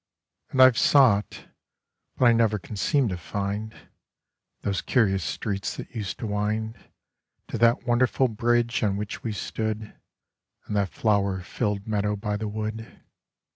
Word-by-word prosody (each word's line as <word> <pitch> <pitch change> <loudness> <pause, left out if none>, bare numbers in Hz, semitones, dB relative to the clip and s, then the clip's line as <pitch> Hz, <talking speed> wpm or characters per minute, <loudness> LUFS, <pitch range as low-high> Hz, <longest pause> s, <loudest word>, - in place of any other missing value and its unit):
And 130 - +5
I've 130 -3 +6
sought, 115 -8 +3 0.7
but 130 - +3
I 120 - +7
never 115 -2 +2
can 105 +2 -9
seem 135 +6 +2
to 90 - -3
find 100 +5 -4 0.9
Those 100 -2 -1
curious 95 -7 +2
streets 100 0 -3
that - - -8
used 105 -5 -4
to - - -5
wind 110 +2 -2 0.7
To - - -4
that 115 0 +4
wonderful 125 +2 +2
bridge 120 +1 +1
on 100 -3 +1
which 105 0 -5
we 115 - -3
stood, 110 +1 -4 0.7
And 105 - -4
that 100 -2 +1
flower 100 -3 +1
filled 105 +1 -2
meadow 105 -1 0
by 105 0 -3
the 105 +1 -3
wood. 110 +1 -5
105 Hz, 145 wpm, -26 LUFS, 100-115 Hz, 0.9 s, I